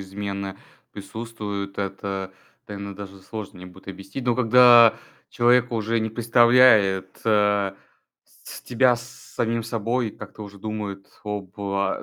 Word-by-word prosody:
измена 100 0 -5 0.4
присутствует. 105 -2 -7
Это, 95 -1 -4 0.4
наверно, 100 -1 -7
даже 100 -1 -10
сложно 100 0 -8
мне 90 - -10
будет 95 +2 -15
объяснить. 95 +6 -8
Но 120 -1 +2
когда 120 -1 +7 0.3
человек 120 0 +2
уже 115 +1 -1
не 110 0 -2
представляет, 115 -5 +4
э, 105 -2 +2 0.5
с - - -13
тебя 125 0 +2
с 120 - -9 0.3
самим 115 0 -1
собой, 115 +1 -2
как-то 105 +1 -11
уже 100 -1 -11
думает 100 -2 -6 0.2
об 105 -2 -6
а 100 -1 -2
105 Hz, 130 wpm, -23 LUFS, 100-115 Hz, 0.5 s, когда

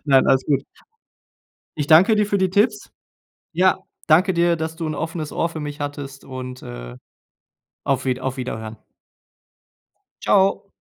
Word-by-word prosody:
Nein, 135 -3 +4
alles 130 0 +3
gut. 140 -2 +1 1.1
Ich 145 - -1
danke 185 +9 +6
dir 210 -1 +2
für 200 -1 0
die 190 -1 +1
Tipps. 210 +2 +1 0.6
Ja, 185 +2 +3 0.3
danke 175 +5 +4
dir, 170 0 +2
dass 160 0 -4
du 165 -2 -4
'n 155 - -2
offenes 160 0 -4
Ohr 165 - 0
für 160 -2 -7
mich 145 0 -6
hattest 145 -1 -6
und, 130 -1 -7
äh, - - -8 0.9
auf - - 0
Wied 130 -1 0
auf 130 0 -3
Wiederhören. 110 -3 -5 1.5
Ciao. 195 0 +2
155 Hz, 150 wpm, -22 LUFS, 130-180 Hz, 1.5 s, danke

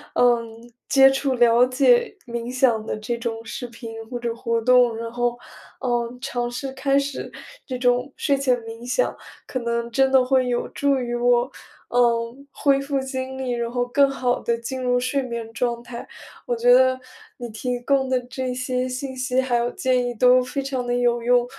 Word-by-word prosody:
嗯， 235 -1 +1 0.2
接 270 -1 +7
触 270 -1 0
了 240 0 +5
解 255 +7 +3
冥 235 0 -5
想 250 -4 +2
的 - - -2
这 215 +3 -3
种 230 -1 -4
视 245 - -6
频 230 -1 -9
或 245 - -4
者 235 -1 -2
活 230 0 -1
动， 250 -1 +4
然 230 0 -5
后， 240 0 -1 0.4
嗯， 240 -1 -1
尝 240 -1 -2
试 265 +2 -5
开 275 +1 +1
始 280 -1 -3 0.4
这 255 - -3
种 250 +2 +1
睡 280 - +1
前 265 -2 +1
冥 225 +1 -9
想， 255 - 0 0.3
可 255 - -4
能 235 0 -2
真 265 +2 +3
的 260 -1 +5
会 260 -1 +2
有 240 - -1
助 280 -1 +1
于 245 -2 -3
我， 240 0 +3 0.5
嗯， 240 +2 +1
恢 275 -1 +2
复 275 0 -1
精 265 0 -4
力， 260 -1 -3
然 235 -1 -2
后 245 0 0
更 275 +3 +3
好 255 -2 0
地 235 0 -1
进 255 +3 -5
入 245 -1 +2
睡 255 +3 0
眠 235 -3 -5
状 235 0 -2
态。 240 0 -8 0.4
我 240 - 0
觉 245 +1 +5
得 260 0 +4 0.4
你 240 - -6
提 245 +3 -3
供 265 +1 +1
的 260 -1 +2
这 250 +1 -4
些 255 0 -2
信 260 +1 -5
息， 255 0 0
还 260 -2 -1
有 235 0 0
建 255 -1 +1
议 245 - -3
都 250 +2 +5
非 275 +2 -3
常 265 -2 -3
地 245 - 0
有 240 -1 +1
用， 245 +1 +3
245 Hz, 210 characters per minute, -23 LUFS, 235-260 Hz, 0.5 s, 接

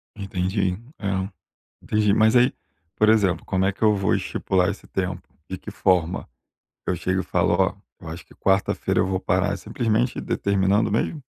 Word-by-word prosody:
Entendi, 95 -1 -1 0.3
é, 95 -1 -1 0.5
entendi. 105 -1 +2
Mas, 110 +2 +4
aí, 125 +1 +5 0.4
por 110 - +4
exemplo, 100 -5 +3
como 95 0 0
é 95 - +2
que 100 - -20
eu 105 -1 +5
vou 95 -1 +1
estipular 90 -1 0
esse 100 - -7
tempo? 90 -1 -3 0.3
De 95 - -4
que 105 - -9
forma? 90 -4 +1 0.6
Eu - - 0
chego 95 +3 -1
e - - -8
falo: 85 -1 +1
"Ó, 95 +2 +2 0.3
eu 85 - -10
acho 80 +1 -8
que - - -19
quarta-feira 95 0 +1
eu - - +2
vou 95 -1 -1
parar", 95 +2 +1
simplesmente, 115 +2 -1
determinando 100 +1 +1
mesmo? 130 +8 -1
95 Hz, 175 wpm, -23 LUFS, 95-105 Hz, 0.6 s, aí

